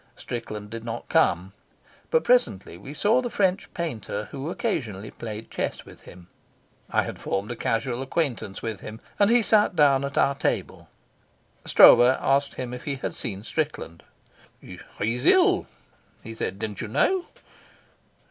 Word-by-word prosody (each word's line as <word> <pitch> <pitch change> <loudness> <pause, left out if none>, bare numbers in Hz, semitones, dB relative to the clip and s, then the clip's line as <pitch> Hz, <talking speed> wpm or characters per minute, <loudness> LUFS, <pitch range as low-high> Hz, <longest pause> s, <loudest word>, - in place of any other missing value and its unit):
Strickland 105 -3 -6
did 115 0 -6
not 115 0 -6
come, 90 +3 +2 0.6
but 480 - +2
presently 240 - +2
we 100 +10 -10
saw 215 +11 +2
the 245 - -3
French 195 -3 0
painter 110 - -4
who 140 +2 -5
occasionally 115 - -3
played 110 -1 -8
chess - - -3
with - - -15
him. 90 -1 -14 0.6
I - - +2
had - - -7
formed 100 +4 -3
a - - -4
casual 120 +2 -1
acquaintance 135 - -2
with 110 -3 -4
him, 110 +1 -9 0.2
and 205 0 +5
he 240 0 +4
sat 210 -3 +3
down 140 -3 +4
at 140 0 -4
our 140 - +4
table. 140 - -3 0.8
Stroeve - - +8 0.2
asked 140 +1 +1
him 125 -1 -5
if 125 - -8
he 145 -2 -2
had 135 - -4
seen 100 -5 -5
Strickland. 145 - -3 0.6
"He's 120 +3 -5
ill," 375 0 +5 0.6
he 115 - -7
said. 100 -3 -4
"Didn't 105 -1 -5
you - - -4
know?" 360 - +1
125 Hz, 155 wpm, -25 LUFS, 110-165 Hz, 0.8 s, Stroeve